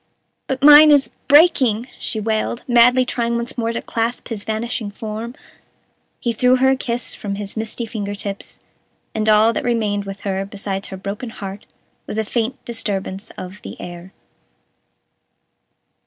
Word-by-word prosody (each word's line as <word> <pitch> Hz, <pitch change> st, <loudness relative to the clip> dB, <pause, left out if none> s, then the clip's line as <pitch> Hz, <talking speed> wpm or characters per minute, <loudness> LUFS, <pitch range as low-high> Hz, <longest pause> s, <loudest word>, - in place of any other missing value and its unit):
"But 265 Hz, 0 st, -3 dB
mine 295 Hz, +1 st, +10 dB
is 285 Hz, -2 st, +4 dB, 0.2 s
breaking," 265 Hz, -7 st, +5 dB
she 220 Hz, -, -3 dB
wailed, 220 Hz, +2 st, -1 dB
madly 250 Hz, +1 st, +5 dB
trying 235 Hz, -1 st, -1 dB
once 235 Hz, 0 st, -3 dB
more 230 Hz, -2 st, -1 dB
to 230 Hz, -, -4 dB
clasp 230 Hz, +2 st, -2 dB
his 215 Hz, -4 st, -5 dB
vanishing 220 Hz, 0 st, -3 dB
form. 220 Hz, +3 st, -6 dB, 0.8 s
He 235 Hz, -, -1 dB
threw 250 Hz, +3 st, +4 dB
her 265 Hz, +1 st, +3 dB
a 265 Hz, -, +4 dB
kiss 240 Hz, -2 st, -2 dB
from 200 Hz, -1 st, -5 dB
his 200 Hz, -1 st, -6 dB
misty 225 Hz, +1 st, -3 dB
finger 205 Hz, -2 st, -4 dB
tips, 200 Hz, 0 st, -6 dB, 0.6 s
and 215 Hz, 0 st, 0 dB
all 215 Hz, +2 st, +5 dB
that -, -, -2 dB
remained 215 Hz, -4 st, 0 dB
with 195 Hz, 0 st, -7 dB
her, 195 Hz, -1 st, -2 dB
besides 195 Hz, -1 st, -4 dB
her 190 Hz, -, -7 dB
broken 200 Hz, +5 st, -5 dB
heart, 200 Hz, -2 st, -8 dB, 0.4 s
was -, -, -4 dB
a 220 Hz, -, 0 dB
faint 240 Hz, +4 st, -2 dB
disturbance 200 Hz, -4 st, -3 dB
of 185 Hz, +3 st, -8 dB
the -, -, -9 dB
air. 175 Hz, +1 st, -9 dB
220 Hz, 155 wpm, -20 LUFS, 205-240 Hz, 0.8 s, mine